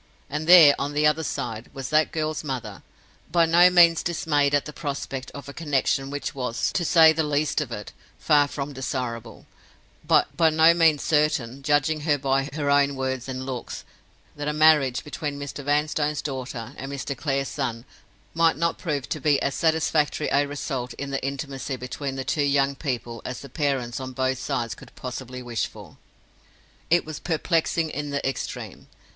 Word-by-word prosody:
And 150 +2 -3
there, 170 -5 +9
on 145 +1 -2
the 150 +1 +2
other 150 +1 +3
side, 115 -6 -4
was 135 -1 -5
that 155 0 +3
girl's 155 -1 -2
mother, 125 -8 -5 0.5
by 170 0 +4
no 170 +2 +6
means 170 -2 +6
dismayed 145 -4 +1
at 145 - +1
the 150 - -8
prospect 140 -3 -5
of 140 -1 -9
a 140 - -8
connection 135 -3 0
which 145 +1 -4
was, 125 -4 -2
to 175 - -1
say 160 -1 +6
the 160 - 0
least 150 0 0
of 135 -5 -5
it, 105 -2 -7 0.2
far 145 -1 +3
from 140 0 -5
desirable; 125 -4 -5 0.6
by 165 -2 +3
no 160 +1 +5
means 165 -3 +3
certain, 150 -5 +1
judging 145 +2 +1
her 150 -1 +1
by 135 0 0
her 150 -1 -3
own 140 0 +3
words 130 -1 -3
and 130 0 -4
looks, 130 -3 -6 0.5
that 145 0 -5
a 150 - 0
marriage 150 -5 +4
between 150 -1 -5
Mr. 140 0 -6
Vanstone's 150 +1 0
daughter 130 -3 -5
and 135 +1 -6
Mr. 140 0 -4
Clare's 135 0 -1
son 120 -4 -4 0.5
might 165 -1 +3
not 170 +1 0
prove 145 -6 -3
to 155 - -3
be 145 -1 +3
as 140 - -1
satisfactory 155 -1 +1
a 145 +1 +2
result 135 -4 -4
of 140 - -4
the 135 - -3
intimacy 135 0 -4
between 135 +2 -5
the 135 -1 -4
two 150 - 0
young 140 -1 +2
people 120 -5 -4
as 125 - -6
the 140 - -10
parents 135 -4 -1
on 130 -1 -6
both 130 0 -1
sides 130 -4 -2
could - - -15
possibly 125 0 -7
wish 120 -3 -2
for! - - -14 0.9
It 175 +1 +3
was 155 -2 -7
perplexing 165 -1 0
in 145 0 -4
the 140 -1 -2
extreme. 135 - -5
140 Hz, 180 wpm, -24 LUFS, 130-155 Hz, 0.9 s, there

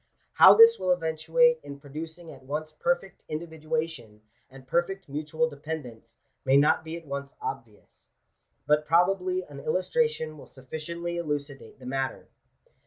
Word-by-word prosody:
How - - +9
this 455 0 +8
will 185 - +1
eventuate 165 +8 +2
in 140 -1 -9
producing 160 +4 -8
at - - -13
once 150 +4 -5
perfect 175 +4 -2
individuation 155 -7 -4 0.3
and 130 0 -14
perfect 190 +6 -1
mutual 155 +3 -1
dependence, 140 -7 -8 0.3
may 135 +1 +4
not 150 +2 +4
be 160 +1 -6
at 170 - -12
once 140 -1 -6
obvious. 115 -5 -8 0.6
But 150 0 +2
probably 195 - +2
an - - -11
illustration 465 - -1
will - - -12
sufficiently 170 +6 -6
elucidate 145 -6 -5
the 130 - -14
matter. 135 +1 -3
155 Hz, 135 wpm, -27 LUFS, 140-170 Hz, 0.6 s, How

